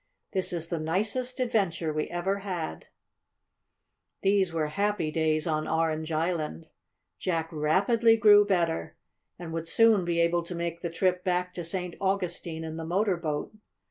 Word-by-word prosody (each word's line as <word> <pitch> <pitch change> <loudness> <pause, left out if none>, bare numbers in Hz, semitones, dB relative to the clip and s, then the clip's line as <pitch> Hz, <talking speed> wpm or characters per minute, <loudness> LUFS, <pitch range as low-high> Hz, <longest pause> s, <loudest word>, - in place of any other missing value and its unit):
"This 190 -1 -1
is 165 -1 -4
the 170 - -2
nicest 215 - -1
adventure 190 -10 0
we 155 0 -1
ever 190 +3 -1
had!" 180 - -5 1.4
These 195 -2 +3
were 160 -2 0
happy 200 -2 0
days 155 -1 +1
on 155 -2 -1
Orange 160 0 0
Island. 155 - -1 0.5
Jack 165 -3 -1
rapidly 200 +9 +3
grew 205 -1 +7
better, 170 - -1 0.4
and 170 -2 -7
would 165 0 -3
soon 225 +1 +4
be 170 -1 0
able 170 +1 +3
to 170 +1 -7
make 170 0 -3
the 170 - -2
trip 180 +2 0
back 180 -1 0
to 175 - -5
St. 180 +1 -3
Augustine 180 -4 -2
in 160 0 -5
the 165 - -4
motor 190 +4 +1
boat. 155 -1 -3
170 Hz, 155 wpm, -28 LUFS, 160-195 Hz, 1.4 s, grew